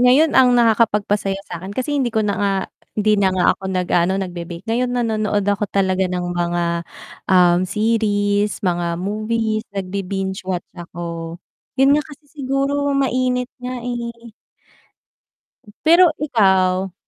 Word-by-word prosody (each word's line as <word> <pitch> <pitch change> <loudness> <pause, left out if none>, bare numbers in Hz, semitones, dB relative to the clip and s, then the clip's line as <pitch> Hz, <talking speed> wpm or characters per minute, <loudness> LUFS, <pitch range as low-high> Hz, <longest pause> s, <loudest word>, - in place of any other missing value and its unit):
ngayon 265 +6 +5
ang 250 -2 +5
nakakapagpasaya 210 -4 +2
sa'kin 175 0 -7
kasi 260 +3 -2
hindi 255 - +1
ko 220 -2 0
na 205 - 0
nga 200 - +2 0.5
hindi 215 0 +2
na 190 - +4
nga 185 -1 +1
ako - - -27
nag-aano, 180 0 +1
nagbe-bake, 175 -1 -6
ngayon 245 +2 +1
nanonood 215 -4 0
ako 205 +1 +1
talaga 190 -1 +1
ng 180 -1 -2
mga, 175 0 -1 0.7
um, 180 -2 +5
series, 205 0 0
mga 175 -2 -1
movies, 215 +2 -1
nagbi-binge 195 0 -4
watch 180 -2 -3
ako, 170 -1 -6 0.4
yun 270 +1 +5
nga 300 - -1
kasi 300 0 -14
siguro 280 0 -1
mainit 255 -2 0 0.2
nga, 250 0 -4
eh. 235 -1 -6 1.5
Pero 340 +3 +6
ikaw 190 -8 +2
205 Hz, 130 wpm, -20 LUFS, 185-245 Hz, 1.5 s, Pero